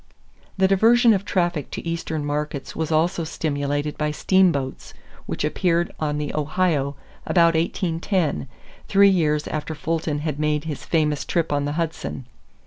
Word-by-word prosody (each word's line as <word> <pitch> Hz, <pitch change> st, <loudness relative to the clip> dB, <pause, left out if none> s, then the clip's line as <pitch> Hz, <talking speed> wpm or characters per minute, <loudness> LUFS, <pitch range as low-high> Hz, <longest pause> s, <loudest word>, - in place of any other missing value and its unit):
The 190 Hz, 0 st, +4 dB
diversion 230 Hz, +4 st, +5 dB
of 200 Hz, -1 st, -1 dB
traffic 175 Hz, -7 st, 0 dB
to -, -, -6 dB
Eastern 160 Hz, -2 st, -3 dB
markets 145 Hz, -1 st, -3 dB
was 160 Hz, 0 st, -2 dB
also 165 Hz, +2 st, +1 dB
stimulated 145 Hz, -2 st, -2 dB
by 150 Hz, 0 st, +1 dB
steamboats 155 Hz, -4 st, +1 dB, 0.3 s
which -, -, -3 dB
appeared 170 Hz, +2 st, 0 dB
on 150 Hz, -1 st, -1 dB
the 150 Hz, -1 st, -3 dB
Ohio 150 Hz, -2 st, 0 dB, 0.3 s
about 170 Hz, -2 st, +4 dB
1810, 165 Hz, -, -1 dB, 0.4 s
three 200 Hz, 0 st, +6 dB
years 150 Hz, -5 st, +1 dB
after 155 Hz, +1 st, -4 dB
Fulton 160 Hz, -1 st, -2 dB
had 150 Hz, -2 st, -3 dB
made 150 Hz, -1 st, 0 dB
his 155 Hz, -3 st, -6 dB
famous 150 Hz, -3 st, +1 dB
trip 165 Hz, -4 st, -1 dB
on 145 Hz, 0 st, 0 dB
the 145 Hz, -, -2 dB
Hudson. 160 Hz, -5 st, -3 dB
160 Hz, 145 wpm, -23 LUFS, 150-175 Hz, 0.4 s, three